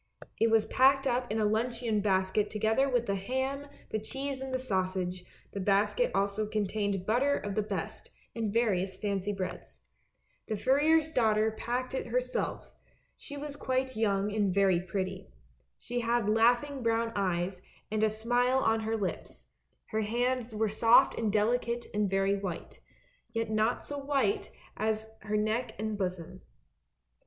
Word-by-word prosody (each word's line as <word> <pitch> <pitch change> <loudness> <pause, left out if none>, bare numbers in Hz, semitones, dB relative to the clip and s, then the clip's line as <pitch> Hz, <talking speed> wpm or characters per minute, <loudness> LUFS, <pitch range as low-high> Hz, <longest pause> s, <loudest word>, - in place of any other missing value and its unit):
It 225 - +4
was 225 -1 +4
packed 270 +1 +4
up 245 -3 0
in 215 - 0
the 215 - +2
luncheon 225 +1 0
basket 195 +1 +1
together 220 +6 +1
with 245 -2 +1
the 200 - 0
ham, 260 +8 -2 0.2
the 215 - 0
cheese 270 +4 -4
and 265 0 -5
the 260 - +1
sausage; 185 -6 -2 0.3
the 200 - -5
basket 205 - +2
also 200 +2 0
contained 205 -2 -1
butter 265 +7 +2
of 205 - -4
the 215 - +1
best, 210 - -5 0.3
and 225 -3 -1
various 195 -5 +1
fancy 200 -1 -1
breads. 195 -2 -6 0.7
The 215 - -2
furrier's 305 +7 +3
daughter 220 -5 +3
packed 245 +4 -3
it 260 - -3
herself, 250 +2 -2 0.4
she 285 - -9
was 285 0 -5
quite 260 -2 -1
young 205 -2 +1
and 205 -3 +1
very 190 -2 +3
pretty. 185 - -4 0.5
She 245 - -3
had 235 -2 +1
laugh 230 +4 +4
ing 285 -2 -6
brown 230 0 +1
eyes, 185 -1 -1 0.3
and 215 0 0
a 220 - +4
smile 245 +4 +1
on 225 -4 +2
her 220 +1 -1
lips; 195 -4 -5 0.4
her 220 - 0
hands 240 +1 -1
were 220 +1 +1
soft 225 +3 +5
and 220 -2 -1
delicate 235 +3 +1
and 210 -1 +1
very 195 +1 +2
white, 190 -4 -6 0.5
yet 225 -1 -1
not 215 +2 +1
so 285 0 -4
white 290 +9 0 0.3
as 220 0 -1
her 210 0 -2
neck 220 +2 -1
and 215 +1 -2
bosom. 180 -4 -4
220 Hz, 160 wpm, -30 LUFS, 200-245 Hz, 0.7 s, soft